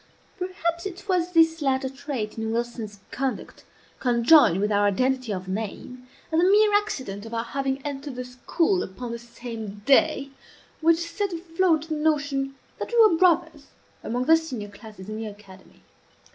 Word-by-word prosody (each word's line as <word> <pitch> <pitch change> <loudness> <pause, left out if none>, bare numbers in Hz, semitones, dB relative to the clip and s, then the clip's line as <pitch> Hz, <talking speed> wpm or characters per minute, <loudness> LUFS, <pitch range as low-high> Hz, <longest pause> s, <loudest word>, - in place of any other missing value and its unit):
Perhaps 360 -1 -2
it 390 +2 -10
was 360 -2 +1
this 325 -1 +4
latter 265 -1 +1
trait 265 -5 -5
in 220 0 -3
Wilson's 230 -3 -4
conduct, 270 0 -4 0.3
conjoined 240 - +5
with 210 +1 0
our 205 0 +3
identity 255 +3 0
of 185 -1 -4
name, 225 +5 -5 0.2
and 320 +1 +3
the 360 - +4
mere 420 0 +5
accident 260 - -1
of 225 +1 -7
our 230 - -1
having 270 +2 -2
entered 285 -1 -5
the 250 0 -5
school 330 +9 0
upon 235 +6 -6
the 235 - -5
same 230 -3 -8
day, 280 -1 +3 0.5
which 325 +1 +4
set 400 +3 -2
afloat 330 -1 0
the - - -1
notion 285 -3 0 0.2
that - - -5
we 475 - +2
were 435 -6 +7
brothers, 325 -4 +2 0.4
among 245 +2 -2
the 320 +3 +7
senior 255 -11 -6
classes 200 -2 -12
in 215 0 -5
the 220 0 -4
academy. 200 -2 -14
270 Hz, 165 wpm, -25 LUFS, 225-325 Hz, 0.5 s, were